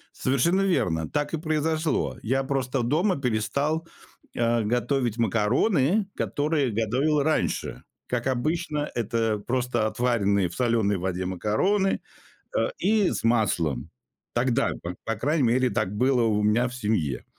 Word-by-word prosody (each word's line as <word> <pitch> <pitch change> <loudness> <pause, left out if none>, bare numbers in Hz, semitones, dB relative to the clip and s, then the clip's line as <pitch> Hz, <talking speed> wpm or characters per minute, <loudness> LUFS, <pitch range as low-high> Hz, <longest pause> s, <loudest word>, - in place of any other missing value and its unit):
Совершенно 155 +9 +2
верно! 85 - 0
Так 145 +1 -2
и - - +1
произошло. 155 0 -1
Я 130 +4 +1
просто 130 -2 -1
дома 160 - +1
перестал, 140 +7 -1 0.5
а, 115 0 +2
готовить 120 +1 0
макароны, 130 - +2
которые 145 -4 0
готовил 130 +8 +1
раньше. 155 +1 -1 0.2
Как 125 0 -2
обычно, 150 +3 -1
это 115 -1 0
просто 125 -1 -1
отваренные 100 -6 +1
в 85 - -10
соленой 115 -5 +1
воде 90 0 -2
макароны, 145 - +1 0.6
а, - - +1
и 210 -3 +2
с - - -4
маслом. 90 - +1 0.4
Тогда, 125 +2 +1
п 85 +1 -5
по 115 0 -2
крайней 145 +7 0
мере, 125 +1 +2
так 95 - -1
было 125 +1 +3
у 105 -2 +1
меня 110 +4 +2
в 125 - -9
семье. 105 - -1
125 Hz, 135 wpm, -25 LUFS, 110-150 Hz, 0.6 s, было